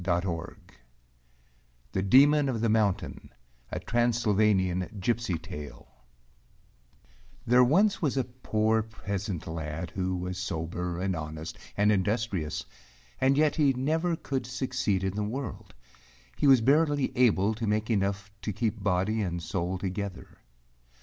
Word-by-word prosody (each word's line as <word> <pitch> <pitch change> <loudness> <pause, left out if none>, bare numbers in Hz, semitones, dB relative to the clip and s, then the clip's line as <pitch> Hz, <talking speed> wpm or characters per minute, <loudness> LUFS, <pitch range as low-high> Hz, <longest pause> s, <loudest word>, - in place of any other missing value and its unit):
179 85 -7 -3 1.1
THE 95 - -1
DEMON 140 +8 +5
OF 120 -4 -1
THE 115 0 +1
MOUNTAIN 105 -3 0 0.4
A - - -2
Transylvanian 105 -5 +1
Gipsy 115 -3 0
Tale 75 -2 -9 1.5
There 125 +2 +6
was 195 - +3
once 140 -4 0
a 130 - +2
poor 110 -3 0
peasant 100 -4 -5
lad 80 +1 -5
who 95 -1 -2
was 90 +1 -4
sober 85 -1 -3
and 95 0 -1
honest 80 0 -6 0.2
and 105 +1 +4
industrious, 100 -5 -1 0.5
and 135 +1 +3
yet 155 +1 +3
he 145 -3 +4
never 160 +7 0
could 135 -5 -3
succeed 125 -6 -1
in 95 -1 -1
the 105 - -2
world; 125 - -5 0.6
he - - +1
was 135 -3 +7
barely 145 0 +2
able 110 -5 +3
to 110 0 -4
make 110 +2 0
enough 100 -1 -1
to 105 - -3
keep 105 +1 -2
body 100 +3 +1
and 85 -4 -3
soul 90 +1 -2
together. 95 0 -5
105 Hz, 130 wpm, -28 LUFS, 90-125 Hz, 1.5 s, was